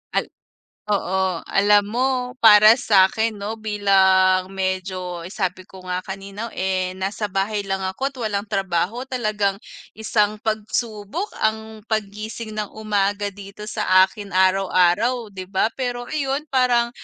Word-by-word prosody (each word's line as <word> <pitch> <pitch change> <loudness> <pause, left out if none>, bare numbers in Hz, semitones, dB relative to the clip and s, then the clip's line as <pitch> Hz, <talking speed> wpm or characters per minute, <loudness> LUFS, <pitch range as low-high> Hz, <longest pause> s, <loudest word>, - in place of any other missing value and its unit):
Al - - +2 0.6
oo, 190 -2 0 0.3
alam 205 +1 +4
mo 240 +5 0 0.3
para 215 -1 +9
sa'kin 215 +2 +3
'no, 205 +2 -4
bilang 190 -3 +3
medyo 185 -2 -3
sabi 185 -2 -3
ko 190 -1 -13
nga 180 0 -2
kanina, 195 +3 -7
eh, 185 -1 -1
nasa 200 +3 -3
bahay 200 +2 -1
lang 195 0 -2
ako't 265 +9 -3
walang 215 -3 -2
trabaho 195 +5 -1
talagang 215 -6 -1 0.3
isang 215 -1 0
pagsubok 220 - -3 0.2
ang 220 0 -3
paggising 215 +1 -4
ng 210 -2 -3
umaga 205 -1 -1
dito 200 +1 -11
sa 185 -4 +4
akin 200 0 -10
araw-araw 190 +5 +2
di 190 -2 -7
ba. 190 +2 +1
Pero 245 -2 -3
iyun 285 0 -2
parang, 245 -2 +2
205 Hz, 125 wpm, -22 LUFS, 190-220 Hz, 0.6 s, para